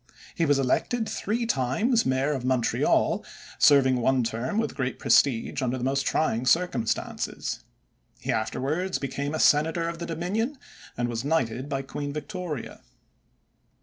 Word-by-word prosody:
He 165 Hz, -3 st, 0 dB
was 145 Hz, -1 st, +4 dB
elected 220 Hz, -, 0 dB
three 230 Hz, +4 st, -2 dB
times 220 Hz, -, +1 dB
mayor 130 Hz, +3 st, +1 dB
of 135 Hz, -4 st, -2 dB
Montreal, 130 Hz, -2 st, +1 dB, 0.4 s
serving 135 Hz, -3 st, +5 dB
one 130 Hz, +1 st, +2 dB
term 115 Hz, -, -2 dB
with 225 Hz, -, 0 dB
great 130 Hz, -2 st, -2 dB
prestige 135 Hz, -1 st, +2 dB
under 130 Hz, 0 st, 0 dB
the 125 Hz, -, -5 dB
most 135 Hz, +1 st, 0 dB
trying 125 Hz, -5 st, 0 dB
circumstances. 135 Hz, -8 st, 0 dB, 0.6 s
He -, -, -2 dB
afterwards 165 Hz, +8 st, -1 dB
became 140 Hz, +2 st, -3 dB
a -, -, -2 dB
senator 160 Hz, +3 st, +3 dB
of 170 Hz, 0 st, -5 dB
the 170 Hz, -, -5 dB
Dominion 200 Hz, -, -2 dB, 0.4 s
and 120 Hz, 0 st, 0 dB
was 120 Hz, 0 st, -3 dB
knighted 130 Hz, -3 st, -1 dB
by 135 Hz, -1 st, -2 dB
Queen 145 Hz, +1 st, -5 dB
Victoria. 165 Hz, -, -5 dB
140 Hz, 145 wpm, -26 LUFS, 130-170 Hz, 0.6 s, serving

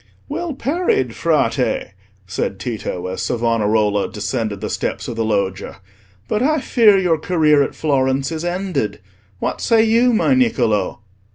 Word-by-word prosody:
"Well 325 Hz, 0 st, -4 dB
parried, 275 Hz, -, 0 dB
Frate!" 130 Hz, -10 st, 0 dB, 0.3 s
said 95 Hz, +1 st, -3 dB
Tito, 105 Hz, -7 st, -4 dB
as 90 Hz, 0 st, -4 dB
Savonarola 110 Hz, -3 st, +1 dB
descended 105 Hz, -1 st, -3 dB
the -, -, -4 dB
steps -, -, -3 dB
of 120 Hz, -, -5 dB
the 115 Hz, -, -1 dB
Loggia. 100 Hz, -3 st, -2 dB, 0.5 s
"But 215 Hz, -, -1 dB
I 310 Hz, +4 st, +2 dB
fear 225 Hz, -6 st, +4 dB
your 175 Hz, -4 st, +1 dB
career 155 Hz, -4 st, +3 dB
at 140 Hz, -, -1 dB
Florence 135 Hz, -1 st, 0 dB
is 160 Hz, 0 st, -4 dB
ended. 175 Hz, -, -2 dB, 0.4 s
What -, -, -3 dB
say 225 Hz, -1 st, +4 dB
you, 230 Hz, +3 st, +3 dB
my 235 Hz, +4 st, +2 dB
Niccolò?" 230 Hz, -, +1 dB
140 Hz, 145 wpm, -19 LUFS, -, 0.5 s, fear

